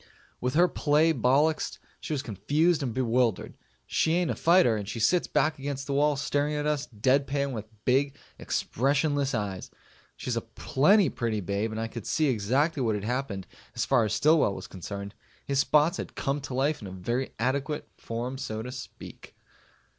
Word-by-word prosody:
With 125 Hz, +2 st, -2 dB
her 175 Hz, +3 st, +6 dB
play 155 Hz, 0 st, +2 dB
bollixed, 140 Hz, +5 st, +2 dB, 0.2 s
she -, -, -7 dB
was 145 Hz, -3 st, -1 dB
confused 145 Hz, -, +1 dB
and 130 Hz, -4 st, -2 dB
bewildered. 120 Hz, -3 st, 0 dB, 0.3 s
She 160 Hz, -, +1 dB
ain't 175 Hz, -1 st, +1 dB
a -, -, -2 dB
fighter, 170 Hz, -9 st, +4 dB
and 105 Hz, -2 st, -4 dB
she 115 Hz, -, -4 dB
sits 170 Hz, +11 st, +3 dB
back 150 Hz, 0 st, +1 dB
against 140 Hz, 0 st, -4 dB
the 140 Hz, -, -3 dB
wall 145 Hz, +1 st, +3 dB
staring 145 Hz, +2 st, 0 dB
at 150 Hz, 0 st, -2 dB
us 150 Hz, -1 st, 0 dB
dead 130 Hz, +5 st, +1 dB
pan 140 Hz, 0 st, -1 dB
with 110 Hz, -3 st, -5 dB, 0.2 s
big 135 Hz, +2 st, +2 dB, 0.2 s
expressionless 140 Hz, +1 st, 0 dB
eyes. 100 Hz, -4 st, -3 dB, 0.5 s
She's -, -, -3 dB
a -, -, -1 dB
plenty 185 Hz, +5 st, +3 dB
pretty 115 Hz, -4 st, -2 dB
babe 100 Hz, +3 st, -2 dB
and 110 Hz, -, -4 dB
I 115 Hz, -, -2 dB
could 115 Hz, -2 st, -8 dB
see 155 Hz, -2 st, +2 dB
exactly 130 Hz, +7 st, +1 dB
what 110 Hz, -4 st, +1 dB
had 100 Hz, -, -4 dB
happened 115 Hz, -5 st, -3 dB, 0.3 s
as -, -, 0 dB
far 115 Hz, -, +3 dB
as 105 Hz, -1 st, -1 dB
Stillwell 150 Hz, -5 st, +3 dB
was -, -, -7 dB
concerned. 100 Hz, +2 st, -7 dB, 0.3 s
His 140 Hz, -1 st, 0 dB
spots 150 Hz, +3 st, +3 dB
had -, -, -6 dB
come 140 Hz, +1 st, -1 dB
to 130 Hz, -2 st, -6 dB
life 140 Hz, +2 st, +1 dB
in 100 Hz, -3 st, -7 dB
very 125 Hz, +6 st, -2 dB
adequate 140 Hz, +5 st, -1 dB
form 120 Hz, +3 st, -5 dB
so 110 Hz, -5 st, -4 dB
to 125 Hz, -, -6 dB
speak. 125 Hz, 0 st, -10 dB
135 Hz, 185 wpm, -28 LUFS, 115-150 Hz, 0.5 s, her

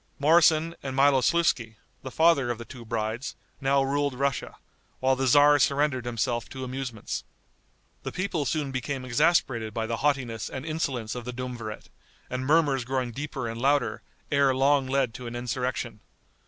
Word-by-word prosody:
Moroson 160 Hz, +2 st, +4 dB
and 135 Hz, -1 st, -5 dB
Miloslouski, 135 Hz, -3 st, +3 dB, 0.3 s
the 130 Hz, -, -6 dB
father 160 Hz, -3 st, +3 dB
of 120 Hz, -, -1 dB
the 115 Hz, -, -8 dB
two 120 Hz, 0 st, -10 dB
brides, 115 Hz, +2 st, -3 dB, 0.3 s
now 135 Hz, 0 st, +3 dB
ruled 140 Hz, 0 st, 0 dB
Russia, 140 Hz, 0 st, -2 dB, 0.4 s
while 130 Hz, 0 st, +3 dB
the 135 Hz, 0 st, 0 dB
tzar 145 Hz, +3 st, +6 dB
surrendered 140 Hz, -3 st, +1 dB
himself 120 Hz, 0 st, -2 dB
to 130 Hz, -, -7 dB
amusements. 130 Hz, -3 st, -4 dB, 0.8 s
The -, -, -5 dB
people 180 Hz, -5 st, -2 dB
soon 145 Hz, -1 st, -1 dB
became 130 Hz, 0 st, -3 dB
exasperated 125 Hz, -5 st, +1 dB
by 115 Hz, -, -1 dB
the 115 Hz, +1 st, -2 dB
haughtiness 125 Hz, -4 st, -1 dB
and 130 Hz, +2 st, -6 dB
insolence 135 Hz, -8 st, -2 dB
of 125 Hz, -, -5 dB
the 125 Hz, -, -5 dB
duumvirate, 120 Hz, -4 st, -6 dB, 0.4 s
and 130 Hz, +1 st, -3 dB
murmurs 145 Hz, -4 st, +3 dB
growing 130 Hz, -1 st, -2 dB
deeper 140 Hz, 0 st, -4 dB
and 115 Hz, +1 st, -5 dB
louder, 140 Hz, 0 st, +1 dB, 0.3 s
ere 140 Hz, -2 st, +3 dB
long 135 Hz, 0 st, +3 dB
led 130 Hz, -3 st, +1 dB
to 125 Hz, +1 st, -7 dB
an 120 Hz, -, -6 dB
insurrection. 125 Hz, +1 st, -3 dB
130 Hz, 160 wpm, -27 LUFS, 120-145 Hz, 0.8 s, tzar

